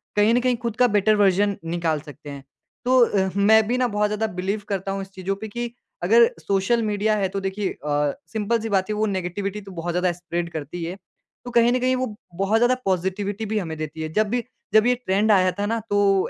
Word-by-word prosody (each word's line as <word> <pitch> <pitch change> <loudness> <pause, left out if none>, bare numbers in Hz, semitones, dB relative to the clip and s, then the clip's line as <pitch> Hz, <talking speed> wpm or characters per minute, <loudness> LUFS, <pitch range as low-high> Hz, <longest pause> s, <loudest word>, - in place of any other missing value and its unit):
कहीं 210 +2 +4
न 245 - +4
कहीं 250 0 +2
ख़ुद 235 -2 -2
का 250 0 +5
बेटर 210 -1 +3
वर्ज़न 200 0 +3
निकाल 165 -2 -1
सकते 145 0 -11
हैं। 140 -1 -8 0.4
तो 255 +1 +4
अ, 190 -3 0
मैं 215 +2 +5
भी 245 +2 +1
ना 255 -1 +2
बहुत 210 -2 +1
ज़्यादा 210 +1 -1
बिलीव 195 +3 -2
करता 195 -1 -2
हूँ 195 0 -3
इस 195 - -8
चीज़ों 190 +1 -3
पे 220 - -4
कि 235 +2 -4 0.3
अगर 230 +5 +6
सोशल 195 +8 +1
मीडिया 215 0 +1
है 195 -2 +1
तो 195 - -3
देखिए 195 +1 -2 0.2
अ, 145 -1 +1 0.2
सिंपल 220 +1 0
सी 225 - -4
बात 195 -1 +1
है 210 - -1
वो 215 +1 +1
नेगेटिविटी 195 +1 -3
तो 195 -1 -11
बहुत 175 -1 -4
ज़्यादा 180 0 +1
स्प्रेड 175 0 -4
करती 160 +2 -5
है 175 +3 -5 0.5
तो 245 - -6
कहीं 235 0 +4
न 255 - +1
कहीं 255 +1 +2
वो 255 -4 -3 0.2
बहुत 195 +4 +2
ज़्यादा 240 +2 +4
पॉजिटिविटी 195 +3 -1
भी 215 +1 -2
हमें 160 -5 -5
देती 155 +1 -5
है। 155 - -3
जब 215 +3 +2
भी 245 +2 0 0.3
जब 215 +1 +6
ये 250 - +5
ट्रेंड 215 -3 +1
आया 185 -2 +4
था 200 +3 -3
ना, 230 +2 0
तो 205 -3 +2
200 Hz, 235 wpm, -23 LUFS, 185-220 Hz, 0.5 s, अगर